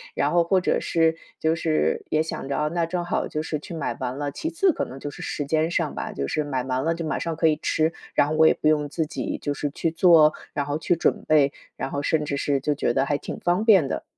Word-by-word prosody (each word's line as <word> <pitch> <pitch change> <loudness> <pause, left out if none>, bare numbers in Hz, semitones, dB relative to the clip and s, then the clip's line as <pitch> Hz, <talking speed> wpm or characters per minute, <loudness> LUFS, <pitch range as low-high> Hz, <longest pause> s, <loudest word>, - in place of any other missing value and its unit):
然 145 - +1
后 170 -1 +3
或 185 +1 +2
者 - - +1
是 165 -1 +1 0.2
就 160 0 +2
是 160 -1 0
也 155 +1 +2
想 160 - -5
着， 140 - -2
哦， 150 0 0
那 170 -1 +1
正 175 +1 -2
好 175 - -1
就 155 - -3
是 155 -2 -3
去 170 - -9
买 160 - -3
完 130 +1 -3
了。 145 -1 -3
其 320 - -4
次 355 +3 +2
可 - - -2
能 130 - -9
就 145 +2 -5
是 - - -10
时 145 - -3
间 155 +2 +1
上 175 - -1
吧， - - -5
就 70 - -3
是 150 - -1
买 130 -3 -2
完了 130 +5 0
就 165 - -4
马 155 - -2
上 165 -1 -3
可 165 +1 +2
以 155 0 0
吃， 160 +1 +1 0.2
然 145 - +3
后 - - -1
我 160 0 +6
也 - - +5
不 155 - +1
用 150 -1 +2
自 160 +2 -2
己 155 - -4
就 145 - -1
是 145 +1 -3
去 160 +3 -1
做， 165 -2 +6 0.2
然 145 - -1
后 145 +1 -2
去 175 - +1
准 170 - 0
备， 145 -3 +4 0.2
然 - - -4
后 140 - -2
甚 155 +1 +1
至 140 -1 -2
是 140 0 0
就 150 +2 0
觉 120 -4 0
得 135 +1 +2
还 145 0 0
挺 - - -7
方 180 +4 +1
便 190 - +6
的。 - - -3
155 Hz, 300 characters per minute, -24 LUFS, 145-165 Hz, 0.2 s, 我